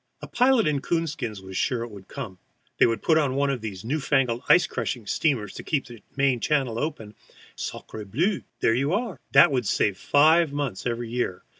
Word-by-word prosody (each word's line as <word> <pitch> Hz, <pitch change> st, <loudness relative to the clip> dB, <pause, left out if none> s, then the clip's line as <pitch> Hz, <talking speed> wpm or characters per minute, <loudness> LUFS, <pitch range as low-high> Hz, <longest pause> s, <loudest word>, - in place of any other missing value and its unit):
A -, -, -8 dB
pilot 250 Hz, -2 st, +3 dB
in 145 Hz, -3 st, 0 dB
coon 165 Hz, +2 st, 0 dB
skins 120 Hz, -10 st, -5 dB
was 95 Hz, 0 st, -9 dB
sure 120 Hz, +3 st, 0 dB
it 120 Hz, -, -8 dB
would 100 Hz, -2 st, -12 dB
come; 95 Hz, -4 st, -7 dB, 0.4 s
they -, -, +6 dB
would 115 Hz, -1 st, -2 dB
put 160 Hz, -1 st, +4 dB
on 135 Hz, -4 st, 0 dB
one 140 Hz, 0 st, +1 dB
of 130 Hz, -4 st, -3 dB
these 100 Hz, -3 st, -6 dB
new 145 Hz, +7 st, -1 dB
fangled 135 Hz, -4 st, +1 dB
ice 180 Hz, -, +6 dB
crunching 120 Hz, -4 st, -4 dB
steamers 115 Hz, -7 st, 0 dB
to -, -, -8 dB
keep 150 Hz, -4 st, -1 dB
the 120 Hz, -4 st, -12 dB
main 135 Hz, -3 st, +2 dB
channel 130 Hz, -5 st, 0 dB
open, 145 Hz, -9 st, -4 dB
and, 105 Hz, -, -18 dB, 0.4 s
sacré 105 Hz, -2 st, -7 dB
bleu, 175 Hz, -, 0 dB, 0.2 s
there 115 Hz, -, +3 dB
you 140 Hz, +7 st, 0 dB
are! 205 Hz, -, -2 dB
That 140 Hz, +1 st, +7 dB
would 125 Hz, -5 st, 0 dB
save 100 Hz, -3 st, +1 dB
five 160 Hz, +2 st, +4 dB
months 140 Hz, -8 st, -3 dB
every 120 Hz, -1 st, -3 dB
year. 120 Hz, -7 st, -2 dB
130 Hz, 210 wpm, -25 LUFS, 115-150 Hz, 0.4 s, That